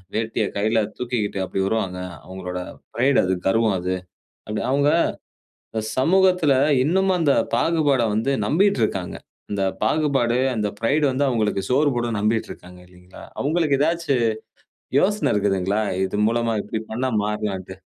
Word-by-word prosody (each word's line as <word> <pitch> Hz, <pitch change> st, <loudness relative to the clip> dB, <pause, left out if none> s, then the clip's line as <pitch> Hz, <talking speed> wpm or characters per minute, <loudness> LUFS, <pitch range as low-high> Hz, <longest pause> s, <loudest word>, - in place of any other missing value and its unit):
வேட்டிய 110 Hz, 0 st, -1 dB
கையில 110 Hz, +2 st, +2 dB, 0.2 s
தூக்கிக்கிட்டு 120 Hz, -5 st, -2 dB
அப்டி 95 Hz, -, -4 dB
வருவாங்க. 95 Hz, -3 st, -1 dB, 0.3 s
அவர்களோட 90 Hz, -1 st, -6 dB, 0.3 s
பிரைட் 130 Hz, +2 st, +3 dB
அது, 95 Hz, 0 st, +1 dB
கர்வம் 110 Hz, +1 st, +2 dB
அது. 90 Hz, +1 st, -2 dB, 0.5 s
அப்டி 105 Hz, 0 st, -2 dB
அவங்க, 140 Hz, +2 st, +3 dB, 0.8 s
இந்த 110 Hz, -, -2 dB
சமூகத்துல 180 Hz, +1 st, +3 dB, 0.3 s
இன்னமும் 190 Hz, +4 st, +2 dB
அந்த 145 Hz, -4 st, +3 dB, 0.2 s
பாகுபாட 145 Hz, -7 st, +2 dB
வந்து 115 Hz, +6 st, 0 dB
நம்பிட்டுருக்காங்க. 120 Hz, -, +1 dB, 0.4 s
இந்த 100 Hz, -1 st, 0 dB, 0.2 s
பாகுபாடு, 135 Hz, -2 st, +1 dB, 0.2 s
அந்த 105 Hz, -1 st, 0 dB
பிரைடு 140 Hz, +7 st, +2 dB
வந்து 140 Hz, +2 st, +1 dB
அவங்களுக்கு 105 Hz, -5 st, 0 dB
சோறு 145 Hz, +3 st, +3 dB
போடும் 120 Hz, -2 st, -1 dB
நம்பிட்டு 110 Hz, +2 st, 0 dB
இருக்காங்க 90 Hz, 0 st, -14 dB
இல்லீங்களா? 90 Hz, 0 st, -14 dB, 0.2 s
அவங்களுக்கு 150 Hz, -1 st, +1 dB
ஏதாச்சு 165 Hz, -3 st, +1 dB, 0.8 s
யோசன 190 Hz, -9 st, +1 dB
இருக்குதுங்களா? 100 Hz, 0 st, +1 dB, 0.2 s
இதன் 105 Hz, +2 st, 0 dB
மூலமா 115 Hz, 0 st, 0 dB
இப்டி 110 Hz, -, -3 dB
பண்ணா 130 Hz, +3 st, -1 dB
மாறலான்ட்டு. 95 Hz, -3 st, -4 dB
115 Hz, 130 wpm, -22 LUFS, 100-145 Hz, 0.8 s, பிரைட்